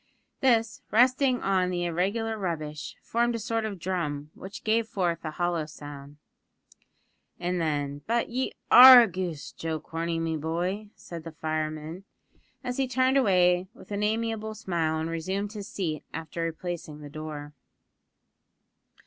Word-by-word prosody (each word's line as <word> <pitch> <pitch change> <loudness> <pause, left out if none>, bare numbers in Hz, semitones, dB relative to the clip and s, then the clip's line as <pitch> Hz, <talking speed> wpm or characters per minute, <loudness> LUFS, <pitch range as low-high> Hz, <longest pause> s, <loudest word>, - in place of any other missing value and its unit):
This, 230 -4 +2
resting 255 +3 +3
on 185 -2 +2
the 175 -1 -1
irregular 200 +7 -1
rubbish, 155 -7 -4
formed 235 +1 +1
a - - 0
sort 225 0 -1
of 205 -3 -4
drum, 160 -5 -3
which 195 +1 -9
gave 220 +1 +2
forth 175 -6 -1
a 155 - -3
hollow 170 0 -1
sound. 145 -1 -10 1.2
"Ah, 175 0 -1
then, 145 -5 -1
but 235 +1 +1
ye 255 +2 -2 0.2
are 250 -1 +12
a - - +1
goose, 175 -5 -4
Joe 160 -1 -4
Corney, 165 +2 -3
me 165 -1 -1
boy!" 175 +7 -2
said 170 -2 -9
the 165 - -7
fireman, 155 +2 -3 0.6
as 250 -1 -3
he 270 -1 +1
turned 260 +1 +2
away 180 -7 +4
with - - -15
an 200 0 -2
amiable 220 0 -1
smile 170 -6 -1
and 160 - -2
resumed 190 +5 -3
his 205 -2 -6
seat 160 -6 -3
after 160 +1 -5
replacing 165 -2 -4
the 145 - -8
door. 150 -1 -7
180 Hz, 150 wpm, -27 LUFS, 160-220 Hz, 1.2 s, are